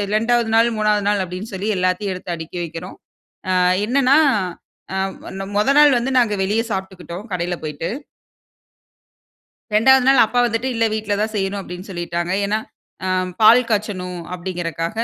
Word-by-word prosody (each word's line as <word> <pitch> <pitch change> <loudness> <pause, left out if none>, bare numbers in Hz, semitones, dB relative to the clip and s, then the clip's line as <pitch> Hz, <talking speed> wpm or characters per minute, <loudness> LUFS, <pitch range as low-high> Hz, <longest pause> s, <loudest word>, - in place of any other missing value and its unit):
2வது 230 +1 +1
நாள், 230 +1 +4
3வது 210 -1 +1
நாள் 205 -2 +1
அப்டீன்னு 185 +4 -7
சொல்லி 200 +3 -3
எல்லாத்தயும் 185 +2 0
எடுத்து 180 -1 -5
அடுக்கி 160 +2 -7
வைக்கிறோம். 165 +2 -8 0.5
அ - - +2 0.3
என்னன்னா, 275 +3 +4 0.8
அ - - -2 0.4
நொ - - -3
மொத 210 +6 +2
நாள் 290 -3 +6
வந்து 245 +3 -2
நாங்க 225 -4 +1
வெளியில 210 +4 +1
சாப்ட்டுக்கிட்டோம் 190 0 -7
கடையில 175 0 -2
போய்ட்டு. 150 +1 -4 1.9
2 265 +4 +5
நாள் 270 -2 +6
அப்பா 245 - -2
வந்துட்டு 235 +2 -1
இல்ல, 230 - +1
வீட்ல 215 -1 -1
தான் 215 +1 -1
செய்யணும் 195 0 -1
அப்டீன்னு 180 +1 -9
சொல்லிட்டாங்க. 175 -1 -3
ஏன்னா, 210 +2 0 0.5
ஆ - - -1 0.3
பால் 240 +3 +7
காய்ச்சணும் 185 -4 -2
அப்டீங்குறதுக்கா 175 -2 -3
200 Hz, 150 wpm, -20 LUFS, 180-225 Hz, 1.9 s, பால்